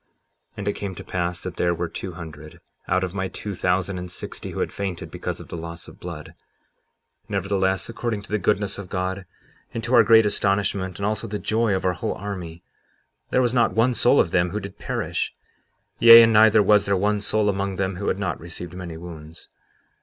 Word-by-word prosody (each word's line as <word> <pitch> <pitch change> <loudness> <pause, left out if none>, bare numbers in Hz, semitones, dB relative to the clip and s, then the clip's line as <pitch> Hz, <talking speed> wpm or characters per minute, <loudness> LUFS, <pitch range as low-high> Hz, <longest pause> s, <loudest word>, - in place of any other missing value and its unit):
57:25 - - -47 0.5
And 100 - -5
it 100 - +1
came 100 -2 -5
to - - -8
pass 90 -1 -3
that 90 -2 -6
there 85 0 +1
were 85 +1 -2
two 90 +2 -6
hundred, 80 -1 -10 0.3
out 95 0 +1
of 90 -1 -3
my 95 -1 -2
two 105 +2 -6
thousand 90 +1 0
and 90 -1 -7
sixty, - - -7
who - - -6
had - - -2
fainted 95 -4 -4
because - - -5
of - - -11
the - - -6
loss 85 +1 -8
of - - -14
blood; - - -8 1.0
nevertheless, 95 -1 0
according 115 -3 -3
to - - -14
the 105 - +1
goodness 100 +1 0
of 95 -3 -8
God, 95 0 -3 0.5
and 115 - -3
to 120 +3 -2
our 120 - +8
great 115 -1 +6
astonishment, 100 -2 0
and 100 - -3
also 105 0 -1
the 105 - -3
joy 110 -1 +1
of 95 - -3
our 90 - +2
whole - - -3
army, 90 -4 -7 0.7
there 130 - +3
was 120 -1 +1
not 120 -3 +2
one 115 +3 +3
soul 125 +3 +4
of 85 - +2
them 90 0 +2
who 105 - -3
did 100 -2 -9
perish; - - -3 0.6
yea, 115 0 +11
and 115 0 +4
neither 110 0 +6
was 105 +1 +4
there 100 -1 +2
one 105 +2 +1
soul 105 0 +1
among 100 -1 -1
them 95 0 -2
who 100 - -4
had - - +1
not 95 -5 -2
received 85 +1 -8
many 90 -3 -7
wounds. 80 -2 -11
95 Hz, 215 wpm, -23 LUFS, 90-105 Hz, 1.0 s, yea